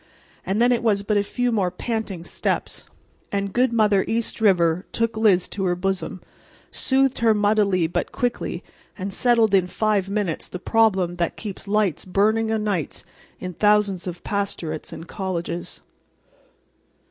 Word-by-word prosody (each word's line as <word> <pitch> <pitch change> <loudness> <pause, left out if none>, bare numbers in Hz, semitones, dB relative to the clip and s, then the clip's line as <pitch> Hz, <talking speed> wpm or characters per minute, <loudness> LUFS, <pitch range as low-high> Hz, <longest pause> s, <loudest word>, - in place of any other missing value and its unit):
And 195 +3 -1
then 240 +1 +4
it 240 -1 +2
was 205 -4 +1
but 210 +1 0
a - - +4
few 245 +4 -1
more 200 -5 +1
panting 200 -2 -4
steps—and 200 +2 -4
good 250 0 +3
mother 210 -4 +3
East 225 0 -2
River 180 -4 +3
took 230 -1 0
Liz 205 -5 +3
to 195 -2 -3
her 175 -1 +1
bosom, 190 0 -3 0.5
soothed 270 -1 +2
her 225 -2 +4
muddily 205 -4 +2
but 160 - -2
quickly, 245 -1 -2 0.3
and 195 0 -4
settled 230 -2 +3
in 185 -2 +4
five 205 0 0
minutes 200 -5 -2
the - - -6
problem 190 -4 +2
that 170 -1 -1
keeps 205 -2 -7
lights 205 -4 +1
burning 215 +4 +1
o' 220 - +1
nights 205 -7 -2 0.3
in 185 -1 -5
thousands 205 -1 +2
of 180 -1 -6
pastorates 195 -6 -3
and 165 - -8
colleges. 175 -3 -4
200 Hz, 150 wpm, -23 LUFS, 185-220 Hz, 0.5 s, then